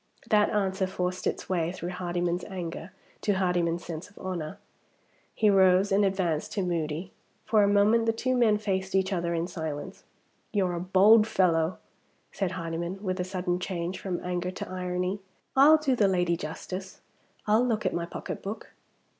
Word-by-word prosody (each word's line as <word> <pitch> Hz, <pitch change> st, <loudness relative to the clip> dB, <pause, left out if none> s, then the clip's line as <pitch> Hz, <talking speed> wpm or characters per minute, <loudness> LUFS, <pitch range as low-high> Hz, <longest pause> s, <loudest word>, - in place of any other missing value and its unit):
That 210 Hz, -1 st, +5 dB
answer 190 Hz, -2 st, 0 dB
forced 180 Hz, 0 st, -2 dB
its -, -, -3 dB
way, 170 Hz, -3 st, 0 dB
through 180 Hz, -1 st, -5 dB
Hardyman's 175 Hz, -1 st, -2 dB
anger, 175 Hz, -2 st, -6 dB, 0.3 s
to 205 Hz, -, +1 dB
Hardyman's 175 Hz, -3 st, 0 dB
sense 170 Hz, +3 st, -6 dB
of 205 Hz, -, -25 dB
honor. 175 Hz, -5 st, -5 dB, 0.8 s
He 215 Hz, -, +3 dB
rose 190 Hz, 0 st, +5 dB
and 200 Hz, +1 st, +4 dB
advanced 185 Hz, -5 st, 0 dB
to 200 Hz, -, -1 dB
Moody. 170 Hz, 0 st, -2 dB, 0.3 s
For 215 Hz, -1 st, +4 dB
a 200 Hz, -, +4 dB
moment 210 Hz, +3 st, +4 dB
the -, -, +5 dB
two 255 Hz, +3 st, -1 dB
men 225 Hz, -4 st, +4 dB
faced 190 Hz, -2 st, -2 dB
each 190 Hz, +1 st, +2 dB
other 170 Hz, -1 st, -1 dB
in 165 Hz, 0 st, 0 dB
silence. 160 Hz, -4 st, -6 dB, 0.5 s
"You're 190 Hz, -4 st, +1 dB
a 170 Hz, -, -2 dB
bold 200 Hz, +5 st, +5 dB
fellow," 175 Hz, -5 st, +2 dB, 0.5 s
said 190 Hz, -3 st, -2 dB
Hardyman, 170 Hz, +3 st, -4 dB
with 185 Hz, -1 st, -2 dB
a -, -, +1 dB
sudden 180 Hz, -1 st, -2 dB
change 180 Hz, 0 st, -3 dB
from 185 Hz, -3 st, -3 dB
anger 180 Hz, 0 st, -2 dB
to 185 Hz, -, -6 dB
irony. 180 Hz, +1 st, -2 dB, 0.4 s
"I'll 290 Hz, +4 st, +8 dB
do 290 Hz, -4 st, +1 dB
the 210 Hz, -4 st, +3 dB
lady 180 Hz, -2 st, +2 dB
justice. 185 Hz, +4 st, -7 dB, 0.4 s
I'll 215 Hz, +3 st, +4 dB
look 225 Hz, -4 st, 0 dB
at -, -, +1 dB
my 170 Hz, 0 st, -2 dB
pocketbook." 200 Hz, +4 st, -6 dB
185 Hz, 170 wpm, -28 LUFS, 175-200 Hz, 0.8 s, I'll